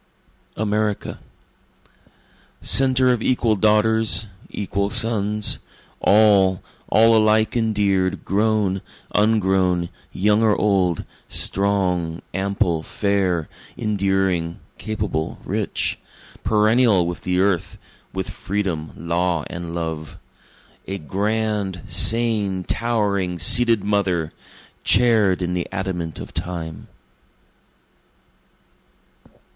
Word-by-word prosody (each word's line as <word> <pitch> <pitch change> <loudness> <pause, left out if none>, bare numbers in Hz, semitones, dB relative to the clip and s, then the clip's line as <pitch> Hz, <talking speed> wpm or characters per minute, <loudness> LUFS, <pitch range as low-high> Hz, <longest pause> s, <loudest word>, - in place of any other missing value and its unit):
America 105 -1 -2 1.4
Centre 130 -1 +4
of 120 - -3
equal 115 -3 +1
daughters, 110 0 +3 0.2
equal 100 0 -2
sons, 105 -1 +2 0.4
All, 100 -3 +4 0.3
all 115 +1 +5
alike 110 +1 +3
endear'd, 100 -5 0
grown, 100 -2 0 0.3
ungrown, 95 -5 +2 0.2
young 105 +3 +2
or 110 -2 +3
old, 95 -5 +1 0.2
Strong, 90 -4 0
ample, 95 -3 0
fair, 95 -3 -1 0.3
enduring, 95 -5 -1 0.2
capable, 105 -7 -3
rich, - - -2 0.4
Perennial 110 -2 +3
with 85 0 -5
the 90 0 -1
Earth, 95 -3 0 0.3
with 95 -1 -4
Freedom, 90 -6 -3
Law 85 -1 -1
and 85 -1 -6
Love, 80 -3 -5 0.7
A 95 - -3
grand, 100 +1 -2
sane, 105 -4 +2
towering, 100 -6 -1
seated 115 +5 +4
Mother, 95 -6 0 0.5
Chair'd 110 -7 +3
in 90 0 -2
the 90 -1 -2
adamant 90 -5 -4
of - - -9
Time. 85 -3 -5
100 Hz, 85 wpm, -21 LUFS, 90-110 Hz, 1.4 s, all